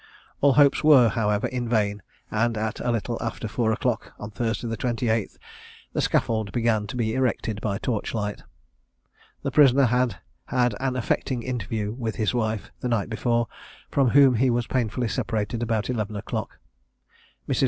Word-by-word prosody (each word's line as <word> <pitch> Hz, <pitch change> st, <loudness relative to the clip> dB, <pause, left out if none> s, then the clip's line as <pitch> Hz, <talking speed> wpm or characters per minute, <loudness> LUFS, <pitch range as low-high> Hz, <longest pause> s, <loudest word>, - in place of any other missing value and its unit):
All 140 Hz, -1 st, +5 dB
hopes 145 Hz, +1 st, +4 dB
were, 135 Hz, -6 st, +7 dB
however, 105 Hz, -2 st, 0 dB
vain, 110 Hz, -4 st, 0 dB, 0.3 s
and 115 Hz, +1 st, +1 dB
at 110 Hz, 0 st, -2 dB
a -, -, -2 dB
little 115 Hz, 0 st, -1 dB
after 115 Hz, -1 st, -3 dB
four 110 Hz, +1 st, 0 dB
o'clock, 110 Hz, 0 st, -1 dB
on 105 Hz, -, -7 dB
Thursday 115 Hz, +2 st, -2 dB
the 115 Hz, -, -2 dB
28th, 115 Hz, -2 st, -1 dB, 0.6 s
the -, -, 0 dB
scaffold 110 Hz, -3 st, 0 dB
began 115 Hz, -2 st, +1 dB
to 125 Hz, -, -6 dB
be 110 Hz, -2 st, 0 dB
erected 115 Hz, -4 st, -1 dB
by 100 Hz, -3 st, -1 dB
torch 110 Hz, 0 st, -2 dB
light. 105 Hz, -1 st, -3 dB, 1.0 s
The -, -, -1 dB
prisoner 140 Hz, -2 st, +6 dB
had 125 Hz, -3 st, +1 dB, 0.3 s
had 125 Hz, -2 st, +1 dB
an 130 Hz, -1 st, -1 dB
affecting 125 Hz, 0 st, -1 dB
interview 110 Hz, -4 st, -3 dB
with 115 Hz, -3 st, -4 dB
his 110 Hz, +1 st, 0 dB
wife, 110 Hz, -3 st, -2 dB
the -, -, -3 dB
night 115 Hz, -2 st, 0 dB
before, 115 Hz, +1 st, +1 dB, 0.4 s
from 135 Hz, -3 st, +3 dB
whom 135 Hz, -2 st, +6 dB
he 130 Hz, +3 st, +3 dB
was 120 Hz, 0 st, +1 dB
painfully 120 Hz, -1 st, -1 dB
separated 110 Hz, +2 st, -2 dB
about 115 Hz, -2 st, 0 dB
eleven 110 Hz, -4 st, -2 dB
o'clock. 100 Hz, -, -4 dB, 0.9 s
Mrs. -, -, 0 dB
115 Hz, 165 wpm, -25 LUFS, 110-125 Hz, 1.0 s, were